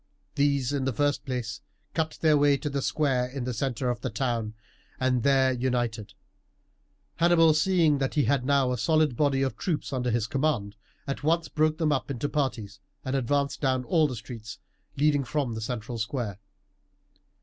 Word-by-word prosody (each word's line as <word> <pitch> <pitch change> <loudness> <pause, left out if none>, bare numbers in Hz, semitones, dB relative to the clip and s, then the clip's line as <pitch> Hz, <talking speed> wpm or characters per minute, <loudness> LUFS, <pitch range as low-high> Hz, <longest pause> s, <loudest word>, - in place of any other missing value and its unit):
These, 140 -2 +1
in 135 -2 -1
the 135 - 0
first 145 +2 0
place, 125 -3 -4 0.3
cut 160 -1 -1
their 155 -2 +5
way 145 -1 +4
to 145 +1 -4
the 140 0 -1
square 130 -4 +1
in 130 0 -5
the 125 0 -2
centre 125 +1 -1
of 120 - -5
the 130 - -2
town, 115 -2 -2 0.4
and 130 -1 +1
there 135 0 +3
united. 120 -5 -2 1.0
Hannibal, 165 -2 +5
seeing 155 -3 +3
he 150 - +2
had 135 +2 +1
now 135 -1 +2
a 125 - -2
solid 155 0 +2
body 135 0 +2
of 135 - -1
troops 160 -5 -2
under 125 -1 -1
his 115 -2 +1
command, 115 -5 -1 0.3
at 140 - -4
once 165 +2 +1
broke 155 0 +1
them 160 -2 +1
up 140 -1 -1
into 140 +1 -2
parties 120 -9 -2 0.3
and 130 +1 -1
advanced 140 +2 0
down 130 -2 +1
all 160 +2 +3
the 130 - -5
streets 115 0 -8 0.4
leading 145 0 +3
from 135 -2 -2
the 110 - -5
central 115 0 -4
square. 110 -3 -3
135 Hz, 175 wpm, -27 LUFS, 120-145 Hz, 1.0 s, their